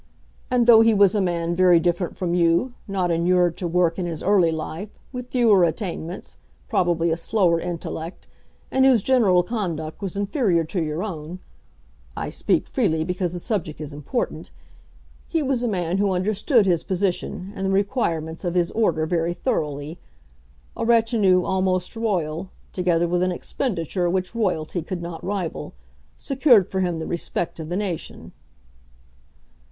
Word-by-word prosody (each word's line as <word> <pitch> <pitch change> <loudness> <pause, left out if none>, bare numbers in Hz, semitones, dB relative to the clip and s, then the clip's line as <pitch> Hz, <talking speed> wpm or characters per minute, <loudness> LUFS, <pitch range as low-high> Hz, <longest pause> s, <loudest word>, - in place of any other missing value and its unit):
And, 245 -1 +3
though 230 -2 +8
he 225 -1 +4
was 200 -2 +5
a 210 - +1
man 170 -2 -1
very 180 -1 +5
different 175 +1 -1
from 175 -3 -1
you, 175 +8 +2
not 185 -3 0
inured 175 0 +2
to 180 - -3
work 170 0 +1
in 180 - -2
his 165 -3 -5
early 190 -4 +4
life, 160 +5 -6
with 250 -1 -7
fewer 225 -7 +4
attainments, 170 0 -3 0.3
probably 170 -2 +1
a - - +2
slower 175 -2 +2
intellect, 170 0 -6 0.4
and 265 - +3
whose 255 -6 +5
general 210 -9 +4
conduct 175 -7 -4
was 195 -1 -4
inferior 200 - +1
to 175 +3 -3
your 155 +3 -2
own, 170 -4 -6 0.8
I - - -3
speak - - 0
freely 170 - 0
because 180 0 -2
the 175 - -4
subject 170 -6 -3
is 150 -2 -6
important, 150 - -3 0.8
he 325 -2 0
was 265 -3 0
a 245 - 0
man 180 -3 -1
who 200 -1 +2
understood 210 - +2
his 175 -4 +2
position 185 0 -2
and 195 0 -2
the - - 0
requirements 195 - -1
of 175 -1 -2
his 175 -1 +1
order 210 -8 +1
very 170 +1 -1
thoroughly. 150 - -3 0.8
A - - -3
retinue 225 -5 +3
almost 185 +1 0
Royal, 185 -6 -2 0.2
together 175 -2 +1
with 175 +1 0
an 185 0 +1
expenditure 180 - -2
which 185 +2 -1
Royalty 180 -7 -1
could 175 +2 -5
not 170 -1 -7
rival, 190 - -4 0.4
secured 265 - +3
for 190 - -1
him 175 -3 0
the 160 - -4
respect 170 0 -3
of 160 -1 -6
the 175 - -1
nation." 195 -5 -5
180 Hz, 160 wpm, -23 LUFS, 170-205 Hz, 0.8 s, though